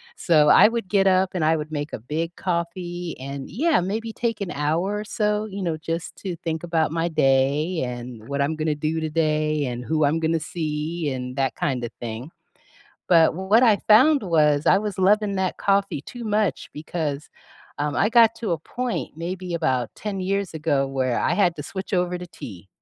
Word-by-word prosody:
So 150 -4 +4
I - - +8
would 230 -4 -3
get 195 0 +3
up, 185 0 +3
and 175 -4 -1
I 160 +1 +3
would 155 +1 -6
make 145 0 -4
a - - -4
big 160 +8 -4
coffee 175 -1 -3
and 140 0 -6
yeah, 300 - +2
maybe 220 +4 -3
take 230 -3 -2
an 185 -2 -3
hour 165 +8 -1
or - - -4
so, 210 0 0
you 200 -2 -6
know, 165 -2 -1
just 165 +2 -5
to 185 -3 -5
think 160 -1 -2
about 165 -2 0
my 165 +1 0
day, 145 +3 +2
and 120 -2 -7
what 140 0 -2
I'm 155 +3 -1
gonna 155 -1 -1
do 155 +2 -2
today, 155 -2 0
and 125 0 -4
who 155 +2 +1
I'm 155 +3 +1
gonna 160 0 +1
see, 155 0 -3
and 125 -1 -5
that 135 -2 0
kind 125 -4 -1
of 120 - -4
thing. 120 +4 -6 0.8
But 165 -3 +5
what 195 +6 +3
I 215 -3 +5
found 280 +6 +6
was, 150 -5 +2
I - - +6
was 210 -2 -4
loving 205 +1 +3
that 190 -1 -1
coffee 195 -6 +1
too 245 +7 -9
much, 210 -3 0
because, 150 -1 -4 0.5
um, 145 0 -1
I 210 - +3
got 230 -1 +6
to 220 -6 -2
a 165 - -1
point, 245 0 -4
maybe 180 +1 -4
about 130 -8 0
ten 200 -3 -4
years 195 0 -1
ago, 145 -3 0
where 130 -3 -1
I - - +1
had 175 -4 +2
to 150 - -5
switch 190 +7 -7
over 180 0 0
to 180 - -8
tea. 95 - -11
165 Hz, 200 wpm, -23 LUFS, 150-195 Hz, 0.8 s, I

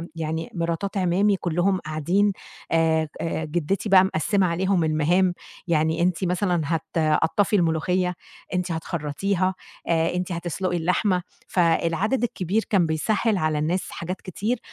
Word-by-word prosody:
يعني 160 0 -3
مراتات 170 +3 -2
اعمامي 195 +3 +2
كلّهم 180 +1 0
قاعدين 170 +7 +1 0.4
آآ 160 -1 +3
ك 150 - -14
آآ 160 -1 -2
جدّتي 175 +6 -1
بقى 190 -1 +7
مقسّمة 190 +2 +1
عليهم 180 +1 +1
المهام 165 +4 +2 0.3
يعني 160 0 +1
أنتِ 180 +1 +1
مثلًا 180 -1 +1
هتقطّفي 160 +5 +1
الملوخية، 180 +1 +1 0.4
أنتِ 180 0 -1
هتخرّطيها، 170 +4 -1 0.3
آآ 165 0 +1
أنتِ 180 +1 -2
هتسلقي 175 +1 -2
اللحمة، 180 +2 +1 0.3
فالعدد 180 +7 +1
الكبير 210 -1 0
كان 190 -5 +3
بيسهّل 200 +7 +1
على 155 -2 0
الناس 170 +5 -1
حاجات 180 +3 -5
كتير، 215 +6 -2
175 Hz, 130 wpm, -24 LUFS, 160-190 Hz, 0.4 s, بقى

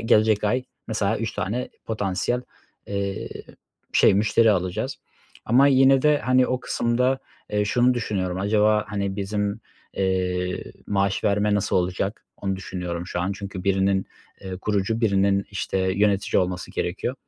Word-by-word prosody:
gelecek 110 -1 +3
ay 125 +5 +1 0.2
mesela 110 -1 0
3 115 -1 -3
tane 115 +7 -2 0.2
potansiyel, 105 +3 -1 0.4
eee, 100 -1 -3 0.6
şey - - +5
müşteri 110 +2 +4
alacağız. 90 -3 -1 0.5
Ama 130 +5 +5
yine 135 0 +5
de, 150 -1 +4
hani, 130 0 +3
o 130 0 -1
kısımda, 125 +3 +1 0.3
eee, 105 0 +1
şunu 125 +4 +3
düşünüyorum; 95 -6 -2
acaba, 105 +1 +3
hani, 100 -1 -2
bizim, 100 0 -2 0.3
eee, 90 -1 -1 0.2
maaş 100 0 0
verme 105 0 +2
nasıl 100 - +1
olacak, 95 +3 -1
onu 95 -1 -2
düşünüyorum 90 -2 -5
şu 90 - -3
an 95 +2 -1
çünkü 95 -1 -7
birinin, 95 0 +2 0.3
eee, 95 -1 -6
kurucu 105 +3 -1
birinin, 100 -2 +2
işte, 95 -1 -2
yönetici 100 +2 +2
olması 90 0 -4
gerekiyor. 95 +8 -2
100 Hz, 140 wpm, -24 LUFS, 95-110 Hz, 0.6 s, şey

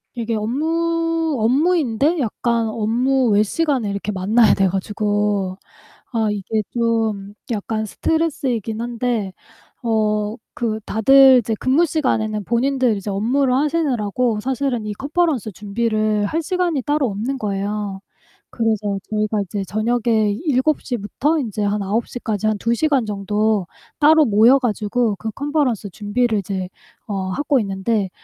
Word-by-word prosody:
이게 230 -1 -2
업무, 330 +6 0
업무인데 285 +3 +2
약간 235 -1 0
업무 240 +4 +1
외 205 - +4
시간에 265 -3 0
이렇게 200 +1 -3
만나야 210 +4 +3
돼 195 - +2
가지고 205 0 -1 0.5
아 225 -3 0
이게 210 +2 -2
좀 225 -4 -1 0.2
약간 220 0 -2
스트레스이긴 245 - -1
한데 235 -4 -2 0.5
어 215 -2 0 0.2
그 220 -2 -2
다들 265 +4 +6
이제 225 -1 -2
근무 270 +6 +3
시간에는 220 -9 -1
본인들 250 +1 +1
이제 200 +1 -5
업무를 250 +6 +1
하시느라고 250 -7 0
사실은 260 -1 -2
이 210 - -3
컨퍼런스 280 - -1
준비를 215 +1 -1
할 325 +9 -2
시간이 345 -5 -1
따로 295 -2 +1
없는 230 +7 -3
거예요. 205 -1 -3 0.5
그래서 215 -4 -1
저희가 215 0 0
이제 200 +1 -4
저녁에 220 +1 +1
7:00 270 -2 +1
부터 285 +10 -1
인제 215 -6 -3
한 205 +1 0
9:00 225 +5 -2
까지 215 -3 -3
한 215 -1 +1
2 235 +2 +1
시간 280 -3 +1
정도 210 0 0 0.3
따로 310 +1 +6
모여 230 +4 +5
가지고 230 -2 0
그 220 +4 -5
컨퍼런스 280 -7 -1
준비를 220 +4 0
이제 190 -1 -4 0.4
어 195 -3 -3
하고 285 +4 +1
있는데 195 0 -1
225 Hz, 285 characters per minute, -20 LUFS, 210-265 Hz, 0.5 s, 다들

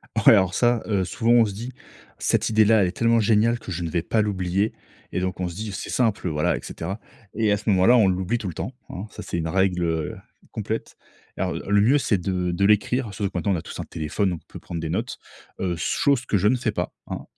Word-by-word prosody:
Ouais, - - +6
alors 95 -1 +3
ça, 120 -2 +2
heu, 100 -3 +1
souvent, 115 +7 0
on 120 -1 +6
se 100 - -4
dit: 120 +6 -7 0.5
«Cette - - +1
idée-là, 110 -1 +5
elle 90 - +3
est 90 - -4
tellement 115 +1 +3
géniale 115 +2 +3
que - - -8
je 90 0 -3
ne 85 - -2
vais 85 +1 0
pas 110 +6 +1
l'oublier». 100 0 0 0.4
Et - - -1
donc, 95 0 -3
on 90 - 0
se 85 - -9
dit: 105 +2 -5
«C'est - - -5
simple, 110 -6 0
heu, - - +1
voilà, 75 -1 +1
et - - -6
cetera». 95 +6 -5 0.3
Et 110 -1 +1
à 105 - +3
ce 105 +2 -3
moment-là, 100 +5 +5
on 110 -4 +5
l'oublie 95 +5 0
tout 110 - -5
le 90 - -4
temps, 105 - -4 0.2
hein. 95 +3 -6
Ça, - - -8
c'est - - -4
une 80 -1 -2
règle, 95 0 +1
heu, 80 -2 -1 0.4
complète. - - -4 0.4
Alors, - - -1
le 100 0 +1
mieux, 130 +7 +5
c'est 115 -7 +1
de 90 0 -1
de 95 +3 +1
l'écrire, 105 +2 +2
surtout 100 0 -2
que, 90 - -6
maintenant, 100 +4 0
on - - -1
a - - -4
tous - - -9
un - - -4
téléphone, 80 +6 -2
donc 90 -3 -3
on - - -28
peut - - -7
prendre 85 - -6
des 80 -1 -4
notes. - - -2 0.4
Heu, 90 -2 -1
s 85 - -6
chose 140 -3 +1
que 105 - +1
je 100 - +2
ne 125 - +4
fais 120 -3 -1
pas, 90 -4 -3
hein. - - -6
100 Hz, 265 wpm, -24 LUFS, 90-110 Hz, 0.5 s, Ouais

